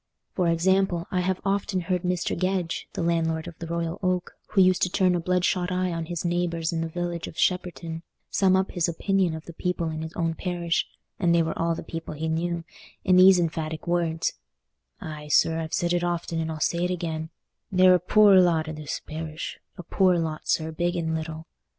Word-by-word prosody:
For 180 -2 +1
example, 175 +1 +2
I 185 - +1
have 185 +1 0
often 195 -1 0
heard 180 0 -1
Mr. 180 -1 -1
Gedge, 185 -2 -1
the - - -2
landlord 165 -1 0
of 175 - -7
the 165 - -6
Royal 170 0 -3
Oak, 185 -1 -1
who 200 - 0
used 185 -1 +5
to 180 - +3
turn 185 0 +2
a 175 - +1
bloodshot 180 +1 0
eye 180 0 0
on 165 -1 -4
his 175 0 -4
neighbours 170 -1 0
in 165 - -1
the 165 - -1
village 175 0 -3
of - - -10
Shepperton, 170 -3 -1 0.3
sum 190 -1 +3
up 190 +1 +1
his 175 -2 0
opinion 185 0 +1
of 160 - -9
the 170 - -9
people 170 -1 -2
in 155 0 -4
his 160 0 -5
own 165 -1 -1
parish—and 170 - -1
they 170 - +4
were 160 - -2
all 165 0 0
the - - -6
people 165 -1 -6
he 160 +2 -3
knew—in 170 +2 -2
these 185 0 +8
emphatic 160 -1 -2
words: 170 -2 0 0.7
"Aye, 150 -1 -7
sir, 160 +2 +3
I've 160 -1 -4
said 175 0 0
it 175 0 +1
often, 170 -1 -2
and 160 0 -2
I'll 155 - -5
say 170 +3 0
it 180 - +1
again, 160 -3 -3 0.4
they're 185 -1 +6
a 180 - +4
poor 200 +2 +6
lot 165 -3 +2
i' - - -3
this 155 -2 -5
parish—a 160 +3 -7
poor 185 +1 +3
lot, 160 -2 -3
sir, 160 0 +1
big 175 +2 -1
and 165 -2 -1
little." 160 0 -4
170 Hz, 205 wpm, -26 LUFS, 160-180 Hz, 0.7 s, these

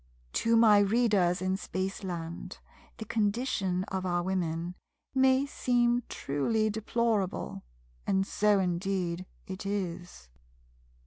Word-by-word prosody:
To 230 0 +2
my 215 -3 +7
readers 200 -4 +2
in 185 0 0
Spaceland 185 -4 -4 0.4
the 220 - -6
condition 205 -4 0
of 190 -1 -2
our 175 -1 0
Women 175 -2 -2 0.4
may 265 +1 +4
seen 245 -3 +1
truly 215 +11 0
deplorable, 220 -2 -1 0.5
and 195 0 +2
so 210 +1 +2
indeed 185 -1 -1 0.2
it 190 -2 -6
is. 180 - -4
195 Hz, 105 wpm, -30 LUFS, 180-220 Hz, 0.5 s, my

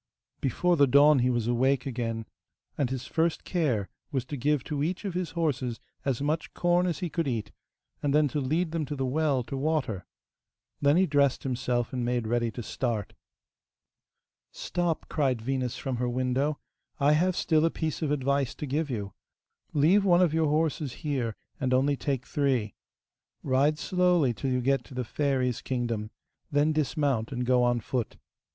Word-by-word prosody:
Before 175 +6 +1
the 140 -1 +5
dawn 140 +2 +6
he 125 +1 +2
was 120 -3 0
awake 130 +3 +2
again, 115 -3 -3 0.5
and 135 -4 0
his 130 -1 -4
first 165 0 0
care 130 - 0 0.2
was 130 -3 -1
to 145 - -5
give 145 +1 +1
to 145 -2 -3
each 180 +7 -2
of 195 - -2
his 180 -1 -2
horses 130 -8 -1 0.2
as 135 -1 -1
much 155 +2 -2
corn 175 +1 +2
as 175 +2 -2
he - - -3
could 165 -4 -1
eat, 115 -5 -2 0.5
and 145 - 0
then 150 +1 +4
to 150 - -2
lead 160 +6 0
them 165 -1 -1
to 145 - -4
the 135 -1 -1
well 140 -1 +1
to 135 - -6
water. 135 - -1 0.7
Then 145 +3 +4
he 190 - +5
dressed 140 -4 +2
himself 125 -2 -1
and 125 -1 -1
made 120 -1 0
ready 120 +1 +1
to 120 +1 -6
start. 115 -3 -2 1.4
'Stop,' 175 -2 -2
cried 135 -6 0
Venus 125 +1 -2
from 130 -2 -3
her 125 +1 0
window, 130 +4 0 0.4
'I 145 +1 +4
have 175 +4 +3
still 155 -3 +2
a 165 - +4
piece 160 -1 -3
of 155 - 0
advice 140 -2 0
to - - -5
give 150 +3 -1
you. 100 -6 -4 0.6
Leave 165 +8 +4
one 180 -2 +5
of 165 -4 +2
your 160 -1 +2
horses 150 -3 0
here, 125 -7 -1 0.2
and 130 -3 +1
only 140 +2 +2
take 135 -2 -2
three. 130 -8 0 0.7
Ride 140 +3 +2
slowly 180 -7 +2
till 135 +4 -3
you 125 -1 +1
get 135 +2 +1
to 135 - -12
the 125 -1 -2
fairy's 130 -2 0
kingdom, 120 -4 -2 0.4
then 145 +2 +3
dismount 140 -6 0
and 125 -1 -2
go 125 0 +3
on 120 -1 +2
foot. 125 0 -3
140 Hz, 180 wpm, -28 LUFS, 125-155 Hz, 1.4 s, dawn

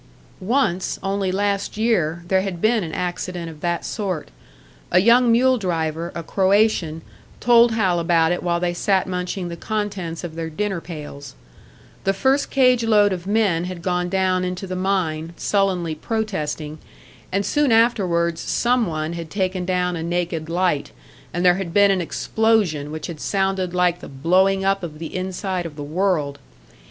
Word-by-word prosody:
Once, 190 -4 0
only 195 -1 -1
last 200 +1 -1
year, 175 -8 +1
there 190 +1 +3
had 190 -3 -4
been 220 +2 +2
an 160 - -5
accident 175 -1 -4
of 150 -1 -14
that 170 -1 -1
sort. 190 -8 -3 0.6
A 180 - +3
young 235 +5 +5
mule 255 +2 +4
driver, 165 -3 -2
a 170 - -4
Croatian, 190 -4 +1 0.4
told 235 -1 +5
Hal 190 -6 +1
about 165 -1 +3
it 175 - -1
while 170 -1 0
they 175 0 0
sat 190 +1 +1
munching 180 0 -3
the 170 - -5
contents 195 -4 -4
of 170 -2 -5
their 165 0 -4
dinner 195 +2 -2
pails. 145 -5 -9 0.7
The 195 - +2
first 265 +8 +1
cage 255 -3 +3
load 210 -3 +4
of 180 0 -6
men 200 -5 +2
had 180 -2 -7
gone 180 -1 0
down 185 -1 +1
into 180 +1 -3
the 185 -1 -5
mine, 175 -4 -1
sullenly 185 -5 0
protesting; 155 -6 -3 0.5
and 195 +1 0
soon 295 -3 +2
afterwards 180 -8 +2
some 245 -2 +1
one 155 0 -3
had 170 -1 -6
taken 185 -1 -1
down 180 -1 0
a 165 - -4
naked 170 -1 -2
light, 175 -4 0 0.4
and 175 +1 -1
there 180 0 +5
had 180 -4 -5
been 200 -1 +6
an 190 -2 +1
explosion 190 -5 0
which 155 0 -5
had 165 -4 -7
sounded 190 -2 -1
like 180 -1 +2
the - - -10
blowing 185 +7 +2
up 195 0 +2
of 160 -4 -7
the 160 0 -7
inside 185 -1 -3
of 150 - -12
the 145 - -6
world. 155 -3 -1
180 Hz, 170 wpm, -22 LUFS, 170-200 Hz, 0.7 s, been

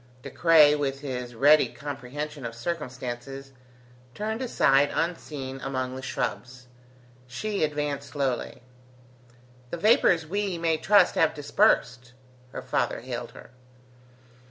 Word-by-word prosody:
De - - -8
Craye, 160 -3 +6
with 140 -2 -2
his 125 -4 -5
ready 145 +6 +5
comprehension 145 +1 -7
of 115 -1 -6
circumstances, 130 -1 -6 0.6
turned 220 +3 -3
aside 145 - +3
unseen 145 -6 -4
among 130 -1 -3
the 130 - -6
shrubs. 125 -1 -4 0.6
She 205 +9 -3
advanced 145 -2 -2
slowly. 135 -3 -3 1.1
"The 170 - -4
vapours, 180 - +4
we 195 +1 -2
may 165 -1 +1
trust, 195 +3 +4
have 160 0 +2
dispersed?" 125 -4 +1 0.4
her - - -7
father - - -1
hailed - - -6
her. - - -14
145 Hz, 115 wpm, -26 LUFS, 130-165 Hz, 1.1 s, Craye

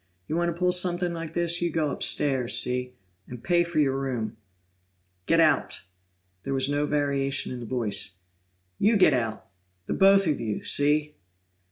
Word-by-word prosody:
You - - -3
want 170 0 0
to 170 - -5
pull 180 0 +2
something 180 -1 +1
like 165 -1 -7
this, 170 0 +1
you 175 - 0
go 155 -3 -1
upstairs, 130 -5 +1
see? 125 0 0 0.3
And 125 -1 -10
pay 175 -1 +2
for 170 -2 -6
your 135 -2 +1
room." 120 -5 -4 0.9
"Get - - +3
out!" - - +1 0.6
There 135 +6 -3
was 135 0 +1
no 145 +1 -1
variation 140 -1 -1
in 125 - -6
the 120 - -8
voice. 105 -5 -1 0.6
"You 215 +2 +3
get 185 -6 +5
out! 115 -4 -3 0.4
The - - -3
both 195 0 +4
of 150 -4 0
you, 105 -2 -4
see?" 150 +1 +1
145 Hz, 170 wpm, -25 LUFS, 125-170 Hz, 0.9 s, get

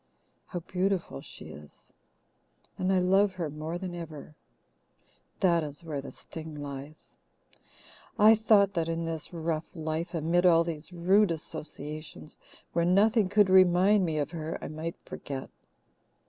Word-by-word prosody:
How 175 - -5
beautiful 180 - -2
she - - -11
is! 75 +1 -14 0.8
And 185 +1 0
I 190 - +3
love 190 +2 +3
her 170 -5 -4
more 155 +3 -4
than 180 -1 -5
ever. 160 -3 -8 1.1
That 170 -4 +3
is 150 +3 -8
where 150 -4 -4
the 140 - -9
sting 160 -1 -9
lies. 140 +1 -9 1.0
I 215 +2 +8
thought 210 -3 +4
that 165 -2 -1
in 165 0 -2
this 165 -2 -5
rough 165 -1 -3
life, 160 +2 -3
amid 165 +2 +1
all 170 -2 +6
these 165 0 -1
rude 190 +4 +3
associations, 155 -1 -7 0.3
where 170 - +2
nothing 200 +3 +3
could 205 0 +4
remind 190 +2 +5
me 160 -3 -1
of 145 +1 -1
her, 160 -1 -4
I - - -6
might 160 +2 -5
forget. 135 -2 -7
170 Hz, 145 wpm, -29 LUFS, 155-185 Hz, 1.1 s, I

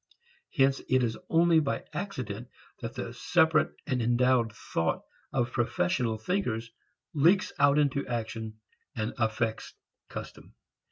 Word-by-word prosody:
Hence 135 0 +3
it 130 -1 +4
is 115 -2 0
only 165 0 +5
by 145 -3 -1
accident 125 - -4 0.3
that 115 +1 -6
the 120 -2 -5
separate 160 +3 +3
and 125 -2 0
endowed 120 0 +3
"thought" 80 -6 -2 0.3
of 120 -2 0
professional 120 0 0
thinkers 115 - -2 0.4
leaks 175 +7 +4
out 145 0 +5
into 140 -2 +1
action 110 -2 -4 0.4
and 110 -1 -2
affects 110 0 -1 0.3
custom. - - -9
125 Hz, 120 wpm, -29 LUFS, 115-145 Hz, 0.4 s, only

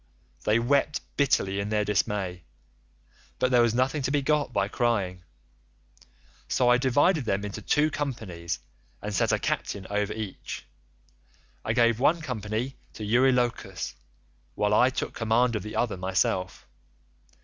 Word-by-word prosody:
They 105 +1 +4
wept 140 +5 +2 0.2
bitterly 100 -8 +2
in 100 +1 -2
their 105 -1 +1
dismay, 95 -3 -1 0.9
but 130 - +1
there 125 -1 +6
was 120 -1 +2
nothing 135 +4 +1
to 130 - -1
be 145 0 +1
got 150 -2 +1
by 100 -4 +1
crying, 100 -6 0 1.3
so 125 -1 +2
I 125 0 +5
divided 145 +4 +3
them 100 -1 0
into 100 - -6
two 155 +1 +2
companies 95 - -4 0.4
and 105 0 -5
set 100 - +2
a - - +3
captain 100 -2 -2
over 105 0 0
each; 110 -3 -6 1.0
I 110 - 0
gave 115 -1 +3
one 155 +6 +3
company 125 -2 -3 0.2
to 110 - -6
Eurylochus, 125 +1 +1 0.6
while 105 0 +1
I 125 +4 +5
took 130 - -3
command 115 +1 +2
of 105 - -1
the 105 +3 -7
other 115 -5 0
myself. 95 0 -1
115 Hz, 145 wpm, -27 LUFS, 100-130 Hz, 1.3 s, there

